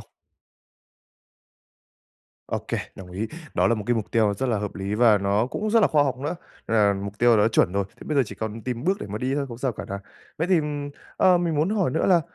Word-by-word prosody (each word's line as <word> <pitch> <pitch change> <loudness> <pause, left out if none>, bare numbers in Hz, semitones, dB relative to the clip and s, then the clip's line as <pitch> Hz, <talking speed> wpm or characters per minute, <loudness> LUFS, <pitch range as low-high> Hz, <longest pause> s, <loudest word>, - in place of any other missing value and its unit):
không? - - -18 2.4
Ô - - -1
kê, - - -1 0.2
đồng 95 -2 -11
ý, 100 +5 -3 0.3
đó - - +3
là 115 - +3
một 105 -2 -5
cái 120 - +2
mục 110 -3 -3
tiêu 110 -3 +2
rất 130 - 0
là 115 -3 +1
hợp 105 0 -4
lý 100 +1 -3
và 110 -2 +5
nó 100 +3 +1
cũng 210 +11 -3
rất 230 +1 +5
là 205 - +5
khoa 150 -2 +3
học 135 -3 -1
nữa, 150 +6 -3 0.3
là 105 -3 +4
mục 100 +1 -6
tiêu 120 -1 +5
đã 105 +1 +4
chuẩn 100 -5 +2
rồi, 100 0 0
thế - - -16
bây 150 - -2
giờ 140 - +5
chỉ - - -8
còn 110 0 -5
tìm 125 0 -4
bước 190 +2 +2
để - - -5
mà 105 +2 -5
đi 130 +3 -1
thôi, 140 -1 -1
không 115 -1 -8
sao 130 0 -1
cả 100 - -7
này. 100 0 -5 0.4
Vậy 165 - 0
thì, 180 -3 +4 0.6
ờ, 185 -1 +5
mình 170 -2 0
muốn 155 +5 +1
hỏi 200 -9 +1
nữa - - 0
là 180 -3 +5
115 Hz, 255 wpm, -24 LUFS, 105-145 Hz, 2.4 s, và